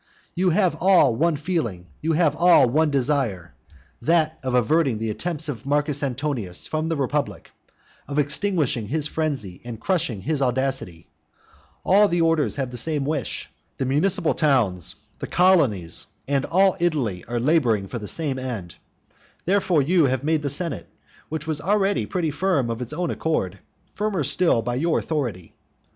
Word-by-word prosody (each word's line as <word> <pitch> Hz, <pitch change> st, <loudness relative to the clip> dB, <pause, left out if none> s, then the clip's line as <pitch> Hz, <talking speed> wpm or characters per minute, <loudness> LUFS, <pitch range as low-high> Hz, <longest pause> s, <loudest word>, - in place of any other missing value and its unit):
You 180 Hz, +1 st, +1 dB
have 185 Hz, +1 st, +2 dB
all 175 Hz, -10 st, +5 dB
one 165 Hz, +5 st, +2 dB
feeling, 145 Hz, -, -3 dB, 0.2 s
you 160 Hz, +1 st, 0 dB
have 155 Hz, -2 st, +2 dB
all 175 Hz, -6 st, +5 dB
one 155 Hz, +6 st, +2 dB
desire, 125 Hz, -, -1 dB, 0.5 s
that 160 Hz, +3 st, +1 dB
of 130 Hz, -2 st, -2 dB
averting 135 Hz, 0 st, +2 dB
the 110 Hz, 0 st, -2 dB
attempts 160 Hz, +8 st, -2 dB
of 130 Hz, -7 st, -5 dB
Marcus 145 Hz, 0 st, 0 dB
Antonius 130 Hz, -8 st, -3 dB
from 155 Hz, +1 st, -2 dB
the 165 Hz, -, 0 dB
republic, 140 Hz, 0 st, -2 dB, 0.6 s
of 140 Hz, +1 st, -5 dB
extinguishing 150 Hz, -, 0 dB
his 150 Hz, +5 st, -1 dB
frenzy 140 Hz, -, -3 dB
and 120 Hz, -2 st, -7 dB
crushing 135 Hz, -, -1 dB
his 150 Hz, +2 st, -1 dB
audacity. 125 Hz, -10 st, -1 dB, 0.8 s
All 205 Hz, +2 st, +5 dB, 0.2 s
orders 155 Hz, -8 st, +1 dB
have 130 Hz, -3 st, -3 dB
the 125 Hz, -, -6 dB
same 145 Hz, +2 st, 0 dB
wish. 145 Hz, -4 st, -2 dB, 0.3 s
The 130 Hz, -, -1 dB
municipal 165 Hz, +6 st, +2 dB
towns, 115 Hz, -, +1 dB, 0.2 s
the -, -, -5 dB
colonies, 140 Hz, -, +2 dB, 0.2 s
and 140 Hz, -1 st, 0 dB
all 190 Hz, +2 st, +3 dB
Italy 135 Hz, -, -1 dB
are 120 Hz, +1 st, -2 dB
labouring 120 Hz, -8 st, +2 dB
for 120 Hz, -, -5 dB
the 105 Hz, -, -7 dB
same 145 Hz, -2 st, -1 dB
end. 110 Hz, -10 st, -6 dB, 0.7 s
Therefore 180 Hz, -5 st, +2 dB
you 165 Hz, +2 st, +3 dB
have 130 Hz, 0 st, 0 dB
made 155 Hz, 0 st, +1 dB
the 145 Hz, -, -2 dB
senate, 165 Hz, +4 st, -1 dB, 0.4 s
which 155 Hz, 0 st, -4 dB
was 155 Hz, -2 st, -2 dB
already 200 Hz, +2 st, +1 dB
pretty 170 Hz, -5 st, -1 dB
firm 145 Hz, -6 st, 0 dB
of 115 Hz, +1 st, -5 dB
its 125 Hz, -, -4 dB
own 175 Hz, +2 st, -2 dB
accord, 100 Hz, -, -2 dB, 0.3 s
firmer 205 Hz, -6 st, -1 dB
still 150 Hz, -6 st, +2 dB
by 120 Hz, +1 st, -2 dB
your 160 Hz, +6 st, +1 dB
authority. 120 Hz, -, -3 dB
145 Hz, 160 wpm, -23 LUFS, 120-165 Hz, 0.8 s, all